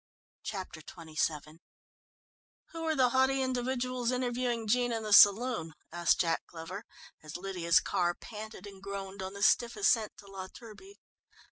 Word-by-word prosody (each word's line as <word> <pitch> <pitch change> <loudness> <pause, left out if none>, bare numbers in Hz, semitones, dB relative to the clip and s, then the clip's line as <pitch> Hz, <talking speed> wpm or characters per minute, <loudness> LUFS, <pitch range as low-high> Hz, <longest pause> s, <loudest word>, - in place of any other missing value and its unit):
Chapter 185 -5 -6
XXVII 155 -1 -4 1.1
"Who 330 - -6
were 320 -1 0
the 255 -3 +4
haughty 265 +1 +2
individuals 255 -1 -1
interviewing 245 -2 -1
Jean 245 +2 +2
in 225 -1 -2
the 210 -1 0
saloon?" 205 -5 +6 0.2
asked 170 -1 +2
Jack 165 -1 +1
Glover, 175 +6 -8 0.4
as 155 +1 -7
Lydia's 175 -3 +2
car 175 -3 0
panted 215 -1 -9
and 195 -2 -11
groaned 195 0 -6
on 190 +1 -5
the 200 0 -4
stiff 235 +2 +3
ascent 230 - +2
to - - -14
La 195 -1 -7
Turbie. 235 - -13
210 Hz, 145 wpm, -31 LUFS, 180-245 Hz, 1.1 s, saloon